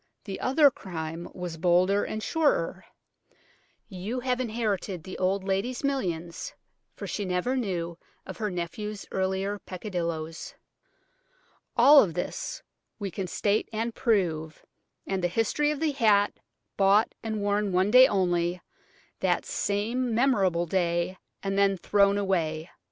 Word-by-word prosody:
The 195 -2 -6
other 280 +2 +5
crime 165 -5 -6
was 175 -2 -6
bolder 180 +4 +3
and 215 0 -4
surer. 190 - 0 1.0
You 210 +5 -4
have 250 0 0
inherited 215 -7 -2
the 185 - -8
old 190 +1 +1
lady's 195 +8 -1
millions, 175 -12 -2 0.4
for - - -7
she 205 - -3
never 185 +7 0
knew 175 -8 -3 0.3
of 190 - -8
her 215 -1 -1
nephew's 195 +4 -5
earlier 190 +2 -1
peccadillos. 170 -5 -5 1.2
"All 285 -7 +8
this 175 +1 -4 0.3
we 200 -3 -4
can 190 +1 -4
state 205 +4 0
and 225 +1 -2
prove, 165 -11 0 0.4
and 190 -2 -2
the - - +4
history 225 +10 +1
of 300 -2 -2
the 315 -1 +1
hat, 215 -7 +3 0.4
bought, 200 +3 +4
and 220 -1 -3
worn 205 0 0
one 185 +3 +2
day 255 +2 +9
only, 175 -2 +1 0.6
that - - +1
same 230 +4 -1
memorable 195 -9 +2
day, 175 +1 0 0.2
and 195 0 0
then 195 -1 +3
thrown 200 +2 +3
away." 170 -5 -1
195 Hz, 130 wpm, -27 LUFS, 175-220 Hz, 1.2 s, day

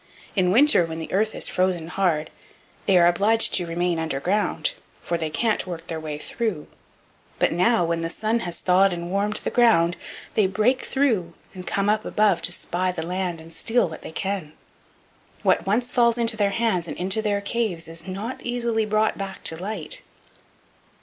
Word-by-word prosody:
In 185 -3 +3
winter, 255 0 +5
when 160 0 -5
the 160 - -6
earth 215 +3 +1
is - - -2
frozen 180 -3 0
hard, 175 -5 0 0.6
they 195 -2 +5
are 170 - +6
obliged 205 +6 +3
to 175 -2 0
remain 170 0 0
underground, 175 - -1 0.3
for 170 - -1
they 160 -2 -2
can't 215 +4 0
work 165 -2 -6
their 165 -2 -4
way 155 -2 -5
through; 195 -1 -3 0.7
but - - +2
now, 180 +2 +3
when 165 0 -1
the 165 - -2
sun 220 +6 -1
has 175 -6 -5
thawed 190 +1 +4
and 170 0 -5
warmed 205 +2 0
the - - -2
ground, 175 -8 +4 0.4
they 210 -3 +3
break 215 +7 +1
through 220 -12 0 0.2
and 185 -2 -9
come 200 0 0
up 215 +1 +2
above 205 -5 +2
to 165 - +1
spy 180 +1 -1
the 165 -3 -4
land 180 -1 -2
and 165 +1 -12
steal 225 +5 +2
what 160 - -9
they - - -8
can; 190 -4 -3 0.9
what - - +2
once 240 +5 +1
falls 235 -1 +3
into 230 -1 +2
their 205 -2 +2
hands 200 -5 0
and - - -6
into 190 +4 0
their 205 -2 0
caves 200 -5 -2
is 165 +3 -7
not 205 +7 -5
easily 235 -2 -1
brought 215 0 +1
back 195 -1 -6
to 160 - 0
light." 185 -2 -3
190 Hz, 185 wpm, -24 LUFS, 170-220 Hz, 0.9 s, are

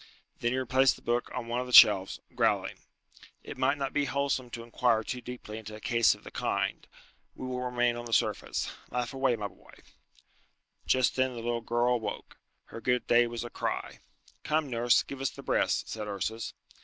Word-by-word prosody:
Then 120 - 0
he 130 - 0
replaced 130 +1 +3
the - - -17
book 120 +1 0
on 125 -2 -4
one 120 +1 -1
of 125 - -5
the - - -7
shelves, 100 -5 +8
growling. - - 0 0.6
"It - - -8
might 140 - +1
not 135 -1 -3
be 145 - +1
wholesome 135 -1 -1
to 115 0 -7
inquire 115 -1 +1
too 125 +3 -5
deeply 120 -3 -7
into 110 -1 -9
a - - -10
case 115 +1 +3
of - - -19
the - - -10
kind. - - -2 0.5
We - - -7
will 125 0 -3
remain 120 -1 +1
on 120 0 -6
the 115 - -8
surface. 110 - 0 0.2
Laugh 125 +1 -3
away, 135 -2 +2
my 105 -2 -4
boy!" 90 - -19 1.1
Just 130 -2 +3
then 130 -1 +1
the 115 - -6
little 120 0 -1
girl 120 +2 +1
awoke. 110 -4 -5 0.3
Her 115 - -10
good 125 0 +1
day 120 0 +4
was 120 0 -5
a 120 - -7
cry. - - -3 0.4
"Come, 150 -3 0
nurse, 120 0 +3
give 140 - -8
her 135 - -4
the - - -3
breast," - - +1
said 110 -1 -5
Ursus. 110 +3 -4
120 Hz, 200 wpm, -29 LUFS, 115-130 Hz, 1.1 s, shelves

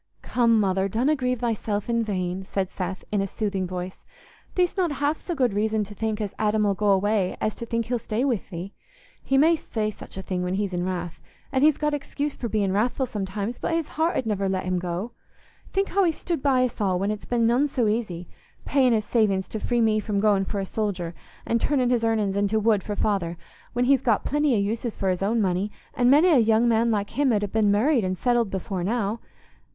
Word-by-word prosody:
"Come, 230 -2 +3
Mother, 190 -1 +1
donna 250 +9 +2
grieve 250 -3 -1
thyself 215 -3 -1
in 235 -1 +1
vain," 185 -3 -2
said 190 0 -3
Seth, 185 +1 -4
in 205 -2 +1
a 195 - -1
soothing 195 -2 -2
voice. 180 0 -5 0.6
"Thee'st 360 -1 +2
not 355 -6 +1
half 290 +2 0
so 345 - -4
good 250 -7 +1
reason 215 +1 +1
to 205 +1 -9
think 220 +1 -2
as 205 -3 -3
Adam 215 0 +2
'ull 200 - +2
go 205 +1 0
away 195 -1 +2
as 215 - 0
to 235 - -7
think 230 0 -1
he'll 245 +1 -1
stay 225 +4 -1
with 245 -8 -1
thee. 180 +2 -7 0.5
He 270 - +1
may 320 +4 +5
say 215 -8 -3
such 195 - -12
a 190 - -5
thing 185 -1 -2
when 180 +1 -1
he's 200 -1 -2
in 175 0 -1
wrath—and 185 - -4
he's 305 -1 +5
got 300 0 0
excuse 290 0 -3
for 235 - -4
being 205 -3 +1
wrathful 240 +6 +1
sometimes—but 210 - -3
his 330 -2 -1
heart 325 +3 0
'ud 255 - -1
never 200 -3 0
let 190 0 -1
him 185 -1 0
go. 180 +6 -4 0.6
Think 390 +1 0
how 395 +1 +2
he's 330 -3 +1
stood 340 -5 -3
by 260 -3 +3
us 240 - -5
all 190 -3 +2
when 200 +3 0
it's 215 - -6
been 235 -2 +1
none 245 +5 +3
so 255 -5 0
easy—paying 220 - -1
his 215 -1 +1
savings 200 -5 +1
to 220 - -4
free 240 +2 0
me 220 -1 +3
from 210 -1 -1
going 200 -2 +3
for 200 - -3
a 195 - -2
soldier, 190 -5 -3 0.3
an' 230 - +1
turnin' 255 -1 +1
his 240 -2 +1
earnin's 215 -4 +1
into 205 +2 +1
wood 215 -2 +3
for 205 - -4
father, 185 -5 -1 0.4
when 245 +1 +1
he's 270 -1 +4
got 230 -6 +1
plenty 295 -3 +2
o' - - +2
uses 220 +3 -2
for 195 - 0
his 180 - -3
money, 200 -2 +1 0.2
and 245 -1 +3
many 300 +7 +6
a 300 -7 +6
young 225 +1 +3
man 230 0 +3
like 205 -2 -1
him 275 +1 +2
'ud 210 -2 +1
ha' 205 - -3
been 215 -2 +3
married 235 +5 +3
and 185 0 -1
settled 240 -2 +1
before 190 -1 -3
now. 215 +2 -1
215 Hz, 225 wpm, -25 LUFS, 195-245 Hz, 0.6 s, many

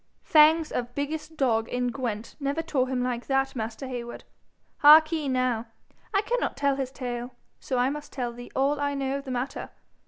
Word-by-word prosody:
'Fangs 315 +1 +5
of 245 0 -3
biggest 310 +2 -4
dog 225 -5 +1
in 245 0 -1
Gwent 230 -4 -4
never 285 +3 -1
tore 260 -5 0
him 255 -1 -1
like 245 -1 -3
that, 270 0 +1
master 225 +2 -4
Heywood. 240 -2 -6 0.6
Heark'ee 310 0 +7
now. 255 -3 0 0.5
He 395 - +3
cannot - - -1
tell 280 -1 +2
his 270 -2 -3
tale, 245 -2 -5 0.2
so 255 - -3
I 250 +2 +2
must 295 0 -7
tell 245 -3 -3
thee 245 +1 -10
all 280 +2 +1
I 285 0 -1
know 275 0 -1
of 280 - -12
the - - -7
matter. 255 +2 -3
265 Hz, 185 wpm, -27 LUFS, 245-290 Hz, 0.6 s, Heark'ee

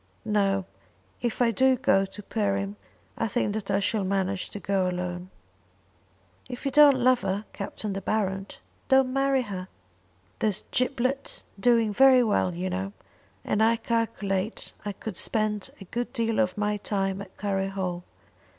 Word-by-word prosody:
No; 195 -3 +1 0.6
if 240 0 0
I 230 - +3
do 260 +3 +4
go 195 -5 +3
to 205 +2 -10
Perim 200 -1 -1 0.4
I - - +1
think 210 -1 0
that 215 -2 -4
I 195 - +2
shall 205 +1 0
manage 190 0 -1
to 205 - -7
go 190 -1 +1
alone." 180 0 -4 1.2
"If 245 +3 -7
you 275 - +1
don't 290 -1 +7
love 255 0 +4
her, 195 +2 -2
Captain 200 +1 -4
De 195 - -4
Baron, 195 -1 -1 0.4
don't 265 -1 +4
marry 270 -1 +2
her." 190 -4 -6 0.7
"There's 210 -2 0
Giblet 255 +1 -1 0.2
doing 230 -1 +3
very 260 +2 +7
well, 205 -5 +1
you 180 +2 -2
know; 190 +2 -3 0.5
and 210 - +1
I 225 +1 +5
calculate 220 -3 -2
I 205 - -2
could 195 -1 -7
spend 215 -2 -1
a 195 - -10
good 240 +6 -3
deal 230 -1 0
of 180 +2 +1
my 210 0 0
time 195 -1 -1
at 195 -2 -11
Curry 195 -1 -1
Hall. 185 -3 -3
205 Hz, 160 wpm, -27 LUFS, 195-235 Hz, 1.2 s, don't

